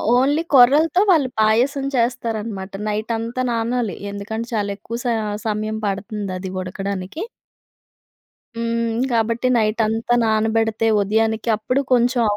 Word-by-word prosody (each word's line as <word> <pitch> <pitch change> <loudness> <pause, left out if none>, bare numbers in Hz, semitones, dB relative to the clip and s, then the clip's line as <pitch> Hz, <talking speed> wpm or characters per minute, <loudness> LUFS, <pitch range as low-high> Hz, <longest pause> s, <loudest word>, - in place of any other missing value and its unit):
Only 280 +5 +3
కొర్రలతో 290 +8 +6
వాళ్ళు 295 -8 +4
పాయసం 245 +6 +2
చేస్తారనమాట. 225 -5 -2 0.2
నైటంతా 225 +3 -2
నానాలి. 230 -3 -1 0.2
ఎందుకంటే 220 +3 -5
చాలా 205 -1 -1
ఎక్కువ 230 +3 -6
స - - -20 0.4
సమయం 215 +1 -2
పడతంది 200 0 -3
అది 185 0 -5
ఉడకడానికి. 195 - -5 1.3
హ్మ్. 230 0 -1
గాబట్టి 230 +2 +1
నైటంతా 225 +1 +1
నానబెడతే 220 0 +1
ఉదయానికి 220 +2 0
అప్పుడు 255 +5 0
కొంచెం 245 0 +3
225 Hz, 105 wpm, -21 LUFS, 215-240 Hz, 1.3 s, కొర్రలతో